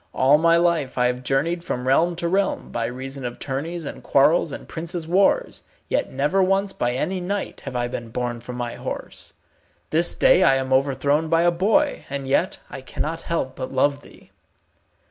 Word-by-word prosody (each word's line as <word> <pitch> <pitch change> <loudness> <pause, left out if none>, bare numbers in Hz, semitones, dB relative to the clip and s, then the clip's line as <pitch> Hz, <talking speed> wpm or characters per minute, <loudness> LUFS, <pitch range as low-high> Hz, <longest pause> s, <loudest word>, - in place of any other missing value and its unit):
All 140 +3 +5
my 165 +1 +4
life 170 -7 +1
I 125 - +3
have 125 0 0
journeyed 150 +7 0
from 125 -7 -3
realm 170 +6 +3
to 170 0 -2
realm, 195 +3 0
by 115 - -2
reason 130 +2 -6
of 120 -1 -5
tourneys 155 +5 -4
and - - -7
quarrels 150 +3 +3
and - - -8
princes' 165 0 -5
wars, 190 +3 +2 0.3
yet - - 0
never 145 +9 +1
once 195 +1 +1
by 120 0 -1
any 185 +9 -2
knight 200 +3 -4
have 135 -2 -6
I 120 0 0
been 120 -1 -6
borne 120 0 -3
from 125 +1 -8
my 120 -1 -4
horse. - - -7 0.6
This 170 +2 +3
day - - +5
I 165 -8 +5
am 130 0 -1
overthrown 140 +3 +1
by 165 +1 +3
a 175 - +4
boy, 220 - +1
and 140 -1 -4
yet 155 +7 +1
I - - -8
cannot 155 +5 -4
help 150 -6 -3
but 130 - -5
love 140 +2 +1
thee." - - -18
145 Hz, 190 wpm, -23 LUFS, 130-170 Hz, 0.6 s, All